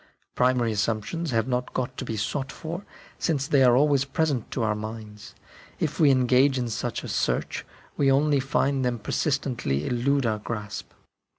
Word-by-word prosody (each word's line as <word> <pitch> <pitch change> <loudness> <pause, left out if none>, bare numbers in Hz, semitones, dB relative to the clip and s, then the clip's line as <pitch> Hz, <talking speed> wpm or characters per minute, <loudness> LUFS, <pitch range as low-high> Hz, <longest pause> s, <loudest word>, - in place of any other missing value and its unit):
Primary 125 -2 +2
assumptions 110 +10 -1
have 115 -2 +1
not 125 -1 -2
got 130 0 -2
to - - -4
be 110 - -3
sought 135 +6 -2
for, 170 +4 -6 0.4
since 145 -5 0
they 140 -2 +4
are 125 -1 +6
always 140 -1 +4
present 140 -3 -1
to 120 - -2
our 110 -1 +2
minds; 105 -1 -8 0.4
if 155 -2 -2
we 155 -3 +6
engage 130 +1 +4
in 120 -2 -1
such 115 +1 -3
a - - -5
search, - - -1 0.3
we 135 -1 +4
only 145 +1 +3
find 135 0 +1
them 125 -1 0
persistently 115 - -1
elude 130 +2 +1
our 110 -2 0
grasp. 105 -1 -5
125 Hz, 170 wpm, -26 LUFS, 115-140 Hz, 0.4 s, are